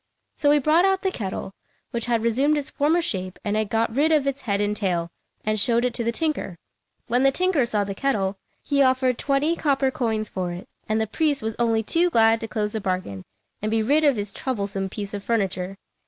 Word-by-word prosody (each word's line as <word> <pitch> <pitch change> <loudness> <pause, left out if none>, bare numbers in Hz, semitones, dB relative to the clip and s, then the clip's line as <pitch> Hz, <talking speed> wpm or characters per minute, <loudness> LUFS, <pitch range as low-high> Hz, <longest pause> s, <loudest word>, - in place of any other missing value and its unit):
So 290 - +2
he 295 - +6
brought 305 +5 +3
out 385 0 +2
the 380 - +1
kettle, 195 - -5 0.4
which 235 0 -3
had 230 -2 +1
resumed 270 +6 +2
its 285 - -4
former 315 +4 +2
shape 185 - -3
and 205 0 0
had 215 -1 0
got 225 +1 0
rid 300 +4 +3
of 300 -3 +3
its 275 0 -2
head 200 -4 -1
and 205 0 0
tail, 175 -5 -1 0.3
and 215 0 +1
showed 235 +3 +2
it 250 - 0
to 235 - -2
the 230 - 0
tinker. 300 - -2 0.5
When 245 +2 +1
the 270 - +5
tinker 325 -4 +1
saw 210 -3 +1
the 200 0 -4
kettle, 200 -5 0 0.3
he 280 -1 +1
offered 255 -2 +2
twenty 290 +4 +1
copper 275 -4 +1
coins 220 -4 -1
for 185 -3 -3
it, 175 +2 -9 0.2
and 215 0 +1
the 220 - +1
priest 290 +4 0
was 220 0 -2
only 225 -2 +2
too 340 +10 +2
glad 225 -5 +4
to 225 - -3
close 210 -2 -2
the 220 - -2
bargain 185 - -3 0.4
and 215 - -1
be 220 0 +1
rid 290 +7 +3
of 285 -3 +4
his 205 -2 -4
troublesome 200 -6 -3
piece 200 0 -6
of 200 -1 -5
furniture. 195 -4 -1
230 Hz, 225 wpm, -24 LUFS, 205-275 Hz, 0.5 s, he